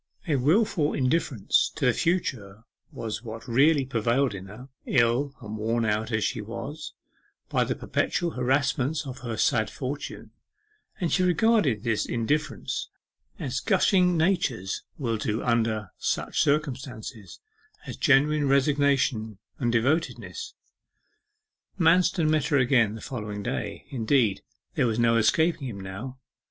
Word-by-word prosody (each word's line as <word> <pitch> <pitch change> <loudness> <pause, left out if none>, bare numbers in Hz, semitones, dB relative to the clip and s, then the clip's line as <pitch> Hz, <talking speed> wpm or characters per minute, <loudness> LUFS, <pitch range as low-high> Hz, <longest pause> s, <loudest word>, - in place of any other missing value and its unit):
A 155 - +2
wilful 155 - +2
indifference 130 -5 +1
to - - -1
the - - +4
future 115 - -2 0.3
was 110 -2 -5
what 115 -1 -8
really 140 +4 +4
prevailed 120 +1 +1
in 95 0 -8
her, 110 +7 -11 0.2
ill 130 +3 +2
and 110 -2 -7
worn 115 +2 0
out, 110 +1 -1
as 110 -2 0
she - - -1
was, 140 +8 -7 0.5
by - - +2
the - - -2
perpetual 175 -1 -1
harassments 135 +3 0
of 130 0 -7
her 120 -3 -5
sad 110 -4 +2
fortune, 140 +2 -6 0.7
and 175 -4 -1
she 185 - +3
regarded 180 - +2
this 115 -3 0
indifference, 145 +7 -2 0.5
as - - -3
gushing 180 -3 +3
natures 155 - 0 0.2
will 115 -6 -1
do 110 +1 -2
under 110 -4 0
such - - -1
circumstances, 130 - -2 0.5
as - - -6
genuine 145 +2 +3
resignation 135 -5 +2 0.2
and 120 -3 +1
devotedness. 160 - -1 1.2
Manston 170 -1 +3
met 155 -2 +2
her 145 - +2
again 125 -5 +3
the 110 - -9
following 105 -5 -5
day: - - -4
indeed, 115 -4 +1 0.3
there 125 - +2
was 110 -1 -1
no 115 -1 +3
escaping 150 +6 +2
him 105 -5 -6
now. 100 +8 -7
130 Hz, 135 wpm, -26 LUFS, 110-150 Hz, 1.2 s, the